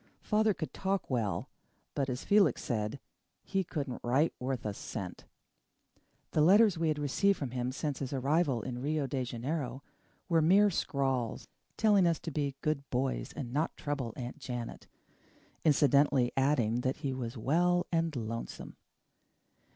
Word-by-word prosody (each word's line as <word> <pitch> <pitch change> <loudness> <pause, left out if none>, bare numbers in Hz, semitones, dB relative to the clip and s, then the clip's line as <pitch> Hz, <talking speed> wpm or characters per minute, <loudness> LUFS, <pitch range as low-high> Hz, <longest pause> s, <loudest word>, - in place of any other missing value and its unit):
Father 215 -1 +2
could 160 - -5
talk 195 -5 -2
well 115 -6 -1 0.5
but, 140 -1 -1
as 125 0 -3
Felix 200 - +4
said, 110 +2 -2 0.4
he 195 -1 0
couldn't 145 -7 -4
write 135 +7 +2
worth 130 -1 -3
a 105 - -1
cent. 95 -2 -6 1.1
The 155 - +2
letters 200 +5 +6
we 165 0 0
had 155 -1 +1
received 170 +8 +2
from 135 -5 -4
him 125 0 -2
since 145 +1 -3
his 135 -2 -4
arrival 135 -2 +1
in 125 -1 -5
Rio 150 +1 0
de 130 0 -2
Janeiro 130 +3 -3 0.4
were 165 -3 +3
mere 195 +6 +5
scrawls, 135 -7 -1 0.3
telling 205 -5 +5
us 165 -2 +2
to 165 - -5
be 140 -2 -1
good 145 -3 -1
boys 130 +1 -1
and 125 -5 -6
not 155 +4 -1
trouble 145 -5 -3
Aunt 125 +3 -6
Janet, 120 -4 -6 0.8
incidentally 140 -3 +4
adding 125 -4 +2
that 130 +1 -1
he 135 - 0
was 125 -1 -5
well 175 +9 +2
and 165 -2 +1
lonesome. 115 -1 -5
140 Hz, 150 wpm, -31 LUFS, 125-165 Hz, 1.1 s, letters